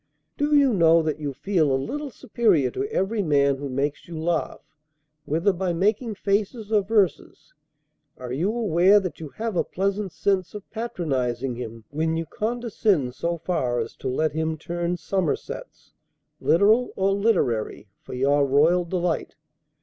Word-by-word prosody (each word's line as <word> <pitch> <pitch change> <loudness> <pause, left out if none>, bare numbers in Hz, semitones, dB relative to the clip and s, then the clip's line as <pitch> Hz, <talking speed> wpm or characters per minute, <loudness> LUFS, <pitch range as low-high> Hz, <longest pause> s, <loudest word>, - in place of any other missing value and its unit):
Do 295 +1 +1
you 280 -4 +5
know 165 -3 +5
that 155 -1 -2
you 145 -2 -3
feel 160 +1 +1
a 135 - +3
little 285 - -4
superior 210 - +1
to 405 - -3
every 210 - 0
man 140 -5 +2
who 140 0 -5
makes 140 +3 -2
you 170 -2 -7
laugh, 165 0 -2 0.6
whether 165 +7 +1
by 180 0 -1
making 210 +5 0
faces 205 +2 -1
or 210 -2 +4
verses? 200 -2 -1 0.6
Are 125 -1 -7
you 160 +10 0
aware 205 -3 +4
that 185 -3 -5
you 155 -2 -7
have 225 +5 -4
a - - +2
pleasant 195 +1 -2
sense 190 +2 -1
of 205 - -8
patronizing 135 - -2
him, 115 -2 -7
when 160 +2 0
you 165 - -2
condescend 215 - -1
so 170 +6 -2
far 130 -8 -1
as 115 0 -4
to - - -5
let 155 +4 0
him 160 +1 -2
turn 175 +2 -3
somersets, 185 -3 -4 0.5
literal 215 +8 +3
or 195 +1 +1
literary, 180 - 0
for - - -8
your 140 +3 +3
royal 160 +6 +3
delight? 175 -1 -2
175 Hz, 155 wpm, -24 LUFS, 145-205 Hz, 0.6 s, you